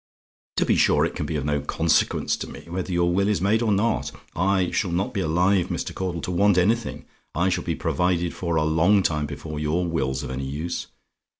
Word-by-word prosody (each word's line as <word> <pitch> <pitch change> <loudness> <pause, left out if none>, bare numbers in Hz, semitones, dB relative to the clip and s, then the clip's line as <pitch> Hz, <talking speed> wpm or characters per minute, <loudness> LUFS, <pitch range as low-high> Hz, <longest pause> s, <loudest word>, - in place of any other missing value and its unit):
"To - - +3
be - - +2
sure, - - +4
it - - -4
can - - -3
be 80 - -3
of 70 -2 -2
no 75 -1 0
consequence 80 +4 +1
to - - -6
me - - -10
whether 90 +2 -4
your 85 0 +2
will 100 +2 +2
is 105 -1 +1
made 105 +4 +2
or 115 -2 +1
not. 105 +3 +1 0.2
I 95 0 +1
shall 95 - 0
not 90 +4 -1
be 100 - -1
alive, 90 +3 +2
Mr. - - -3
Caudle, 90 -3 -3
to 90 - -4
want 100 +1 +3
anything: 110 +5 +1 0.3
I 85 +3 +2
shall 90 - -1
be - - -2
provided 90 -1 0
for 85 -2 -2
a 80 - +2
long 85 +6 +3
time 75 -3 0
before 75 +2 -6
your 80 +4 0
will's 65 -6 -1
of 65 - -5
any 65 +1 -4
use. 80 +5 -4
85 Hz, 220 wpm, -24 LUFS, 80-95 Hz, 0.3 s, sure